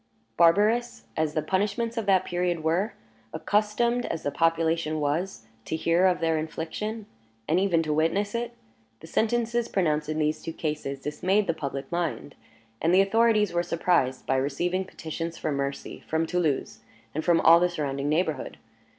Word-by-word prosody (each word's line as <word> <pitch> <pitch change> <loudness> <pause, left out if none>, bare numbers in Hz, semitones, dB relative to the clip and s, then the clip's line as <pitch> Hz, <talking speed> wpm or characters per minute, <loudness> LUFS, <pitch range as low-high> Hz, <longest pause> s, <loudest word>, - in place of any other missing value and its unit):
Barbarous 210 +8 +3
as 155 -1 -1
the 155 - 0
punishments 205 +6 -1
of 225 -4 -3
that 190 -1 +4
period 175 -2 -1
were, 175 +7 +1 0.4
accustomed 215 +7 +1
as 160 - -4
the 145 - -1
population 165 0 +1
was 150 - -2 0.2
to - - -2
hear 170 +3 +3
of 180 -2 +1
their 165 -1 +1
infliction, 200 +8 -4 0.4
and 165 +4 +3
even 180 -4 +2
to 155 -1 -1
witness 165 +7 +1
it, 235 0 -3 0.5
the - - -10
sentences 235 +5 0
pronounced 155 -5 0
in 155 - -2
these 155 0 0
two 165 - -5
cases 150 -4 -4
dismayed 185 +8 +1
the 165 - 0
public 140 -3 -5
mind; 170 -4 -2 0.5
and 170 +3 +3
the 190 - +7
authorities 215 0 +3
were 175 - +2
surprised 165 -6 0
by 135 - +1
receiving 175 +8 -1
petitions 165 -1 -6
for 155 - -2
mercy 140 0 -4
from 160 +1 0
Toulouse, 160 -9 -1 0.3
and 155 - -2
from 170 -2 +4
all 165 +1 +7
the 180 +1 +2
surrounding 145 -4 -2
neighborhood. 155 0 -1
165 Hz, 165 wpm, -26 LUFS, 155-195 Hz, 0.5 s, the